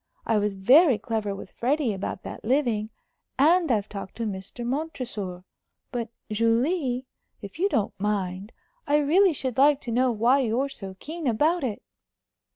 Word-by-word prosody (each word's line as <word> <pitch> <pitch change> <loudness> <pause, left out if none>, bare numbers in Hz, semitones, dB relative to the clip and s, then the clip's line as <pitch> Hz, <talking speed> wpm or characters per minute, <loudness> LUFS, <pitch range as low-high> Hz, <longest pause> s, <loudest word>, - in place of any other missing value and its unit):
I 220 - +2
was 205 -1 -1
very 260 - +6
clever 210 -2 -3
with 195 - -10
Freddie 265 -1 0
about 190 -1 -5
that - - -8
living; 235 -4 +1 0.5
and 325 +3 +4
I've 210 -3 +1
talked 195 -2 -8
to 230 - -4
Mr. 200 +4 -5
Montresor. 240 - -4 0.5
But, 235 -3 -3 0.2
Julie, 245 - +1 0.4
if 200 +10 -9
you 390 +3 +2
don't 215 - 0
mind, 200 0 -2 0.4
I 290 +1 +4
really 335 +6 +4
should 260 -4 -3
like 285 0 +5
to 235 - -5
know 250 +2 +2
why 235 +5 +3
you're 255 +2 0
so 195 -7 -8
keen 320 -1 -5
about 300 +9 +2
it?" 225 -6 -3
240 Hz, 160 wpm, -26 LUFS, 210-285 Hz, 0.5 s, very